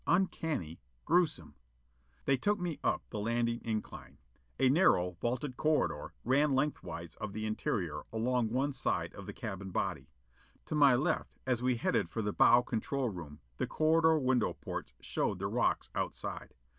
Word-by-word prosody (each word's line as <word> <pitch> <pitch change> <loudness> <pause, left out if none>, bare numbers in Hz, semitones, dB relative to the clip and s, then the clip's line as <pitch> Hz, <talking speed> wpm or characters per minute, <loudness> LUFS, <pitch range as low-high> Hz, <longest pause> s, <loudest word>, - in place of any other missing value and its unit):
Uncanny. 160 - 0 0.3
Gruesome. 175 0 +1 0.7
They 135 - +4
took 205 +11 +1
me 175 -4 -3
up - - +1
the 105 - -3
landing 115 +2 0
incline. 105 - -5 0.4
A 135 - +5
narrow 130 - +4
vaulted 125 +2 -2
corridor 155 0 0
ran 140 +3 +3
length 145 +3 0
wise 85 -2 -7
of 110 -2 -5
the 110 0 -3
interior, 90 -7 -2
along 115 +1 +1
one 135 +5 0
side 135 - -1
of - - -9
the - - -4
cabin 95 0 -5
body. - - -2 0.6
To - - -5
my 145 -4 +6
left 155 +6 -1
as 125 -2 0
we 125 0 +2
headed 115 - 0
for 110 - -3
the 105 0 -1
bow 120 +1 +6
control 130 +2 -1
room, 80 -6 -8 0.2
the - - -1
corridor 160 0 +4
window 130 -3 +2
portes - - -6
showed - - -1
the - - -4
rocks - - 0
outside. - - -4
125 Hz, 160 wpm, -32 LUFS, 110-150 Hz, 0.7 s, my